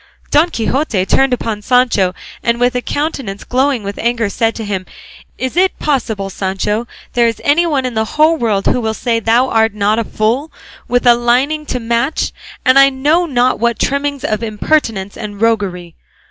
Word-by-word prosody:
Don 310 +4 +4
Quixote 230 - -1
turned 270 +7 +2
upon 225 -4 -2
Sancho, 230 -7 +2 0.3
and 235 0 0
with 245 +1 +2
a 250 - -1
countenance 270 -9 -3
glowing 260 -2 0
with 200 0 -6
anger 235 -2 0
said 225 +2 0
to 225 - -5
him, 190 -3 -3 0.5
"Is 260 +3 -3
it 370 +2 +2
possible, 220 -9 -2
Sancho, 200 +5 -2 0.3
there 240 -1 +3
is 230 - -2
anyone 295 -3 +2
in 250 - -3
the 220 0 0
whole 310 +2 +5
world 220 -8 -1
who 250 - +1
will 220 -1 -2
say 230 -1 0
thou 230 +4 +2
art 225 -2 +2
not 210 +2 +1
a - - 0
fool, 230 +9 -1 0.4
with 245 0 +1
a 240 - +8
lining 255 +6 +1
to 250 - -2
match, 235 +5 -1 0.3
and 255 +1 +6
I 275 0 +7
know 295 +6 +1
not 255 -3 +1
what 235 0 +1
trimmings 280 0 -1
of 215 -7 -1
impertinence 215 -3 -1
and 205 -2 -7
roguery? 200 -7 -1
235 Hz, 180 wpm, -15 LUFS, 215-270 Hz, 0.5 s, a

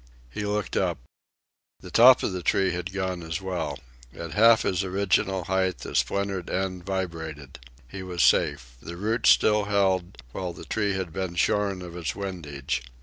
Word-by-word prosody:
He 105 +10 -4
looked 105 -1 -2
up. - - +1 0.8
The 90 - -11
top 125 +2 +7
of - - 0
the 90 - -4
tree 95 +2 +2
had 90 +1 -4
gone 95 -2 -3
as 80 +1 -4
well. 85 -7 -3 0.4
At 85 -1 -7
half 115 +6 +5
its 95 0 0
original 95 0 0
height, 95 +1 -1
a - - -7
splintered 100 -3 -1
end 95 -1 -3
vibrated. 80 -7 -5 0.3
He 95 +10 -8
was 90 -3 -1
safe. 60 -4 +2
The 85 - -8
roots 110 +4 +1
still 105 -1 +4
held, 95 -3 +1
while 90 +5 -4
the - - -11
tree 105 -2 -1
had 95 -4 -4
been 95 -2 -3
shorn 100 +1 +1
of 85 -1 -9
its 85 -2 -3
windage. 75 -11 -4
95 Hz, 170 wpm, -26 LUFS, 85-100 Hz, 0.8 s, top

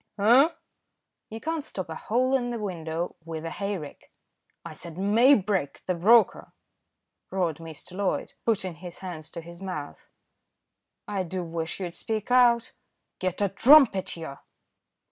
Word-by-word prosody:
"Eh?" 240 +8 +6 0.8
"You 225 - -7
can't 320 +3 -3
stop 190 -10 -5
a 160 - -6
hole 255 +8 +1
in 245 -2 0
a 235 - -3
window 170 -5 -4
with 165 -1 -6
a 165 - -4
hayrick." 195 -6 -5 0.5
"I 170 - -7
said 170 +1 -10
Maybrick, 205 - +3
the 185 - 0
broker," 215 +7 +4 0.8
roared 175 -5 -1
Mr. 165 +2 -10
Loyd, 200 -1 -1
putting 190 -6 0
his 175 +2 -10
hands 160 -4 -7
to 170 - -7
his 170 +2 -12
mouth. 180 -7 -7 1.0
"I 200 -2 -1
do 185 0 -4
wish 165 0 -4
you'd 175 -3 -4
speak 215 +5 -4
out." 240 -2 +4 0.5
"Get 185 +1 -2
a 200 - +2
trumpet. 235 - +5
Yah!" 150 -4 -7
185 Hz, 145 wpm, -26 LUFS, 165-225 Hz, 1.0 s, Eh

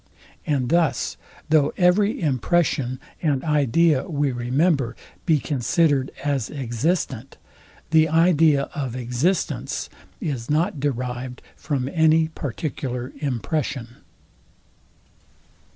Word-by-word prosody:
And 135 -5 0
thus, 165 -5 +1 0.3
though 150 -2 +3
every 195 +3 +3
impression 135 - +1 0.2
and 145 -5 +1
idea 150 +1 +2
we 145 -3 0
remember 130 +2 +1 0.3
be 160 -3 +5
considered 140 +1 +1
as 140 -5 -1
existent, 135 0 -2 0.5
the 160 0 +5
idea 160 -3 +4
of 135 -7 -3
existence 125 +9 -1 0.3
is 125 -6 -4
not 155 0 +1
derived 125 -2 -3
from 135 -4 -2
any 160 +1 +3
particular 130 -3 -4
impression. 130 -2 -3
145 Hz, 90 wpm, -23 LUFS, 125-160 Hz, 0.5 s, be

